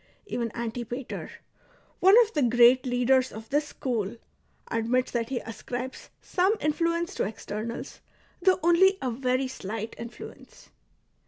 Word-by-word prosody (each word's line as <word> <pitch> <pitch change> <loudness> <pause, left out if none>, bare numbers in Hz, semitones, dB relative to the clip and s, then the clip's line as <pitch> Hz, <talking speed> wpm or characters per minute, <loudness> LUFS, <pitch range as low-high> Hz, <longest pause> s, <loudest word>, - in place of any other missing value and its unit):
Even 235 - -3
Antipater,'^ 235 +2 -5 0.7
one 385 +4 +7
of 445 - -8
the 295 - +1
great 245 +1 +5
leaders 250 +1 +2
of 220 +1 -9
this 295 +1 +1
school, 230 -6 -3 0.5
admits 235 +3 +1
that 230 -2 -1
he 265 - -2
ascribes 245 +3 -6
some 380 +3 +2
influence 335 +4 0
to - - -1
externals, 220 +4 -5 0.4
tliough 375 0 +5
only 375 +3 +5
a 255 - -2
very 255 +2 0
slight 220 -2 -5
influence. 235 +1 -11
250 Hz, 130 wpm, -27 LUFS, 230-300 Hz, 0.7 s, one